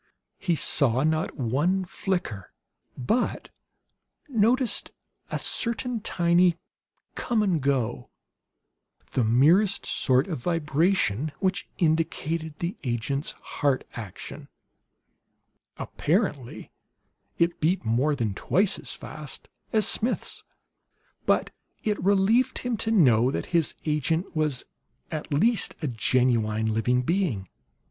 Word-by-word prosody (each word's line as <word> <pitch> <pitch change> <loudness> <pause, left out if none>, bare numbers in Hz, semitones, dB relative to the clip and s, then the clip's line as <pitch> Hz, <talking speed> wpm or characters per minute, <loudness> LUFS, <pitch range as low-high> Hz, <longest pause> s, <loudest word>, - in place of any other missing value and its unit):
He 175 -3 +1
saw 135 -4 +2
not 155 +1 0
one 150 +10 +1
flicker, 175 - -3 0.5
but 220 - -1 0.8
noticed 235 -2 +2 0.4
a - - -2
certain 235 0 -1
tiny 175 -2 +3 0.6
come 225 -3 0
and 180 -7 +1
go, 125 - -1 1.0
the 125 - +1
merest 160 - +4
sort 130 +1 +2
of 165 -8 -4
vibration, 155 - +1
which 190 0 -1
indicated 160 -2 0
the 175 +2 -3
agent's 125 +4 -1
heart 140 -3 -1
action. 105 -6 -8 1.3
Apparently 150 - -2 0.7
it 170 0 +1
beat 165 -3 +1
more 130 +7 +2
than 115 -6 -1
twice 190 - +1
as - - -5
fast - - -8 0.2
as 215 -3 +4
Smith's. 230 +3 -1 0.8
But - - +2 0.3
it 210 -4 -1
relieved 200 +6 +3
him 245 -1 -2
to 220 - -2
know 130 - +5
that - - -2
his 165 -3 +2
agent 160 +4 -1
was 150 -5 +1 0.5
at 155 -1 -5
least 210 +9 +2
a - - +1
genuine 110 -3 +1
living 125 +3 +1
being. 145 - -1
160 Hz, 110 wpm, -26 LUFS, 125-195 Hz, 1.3 s, know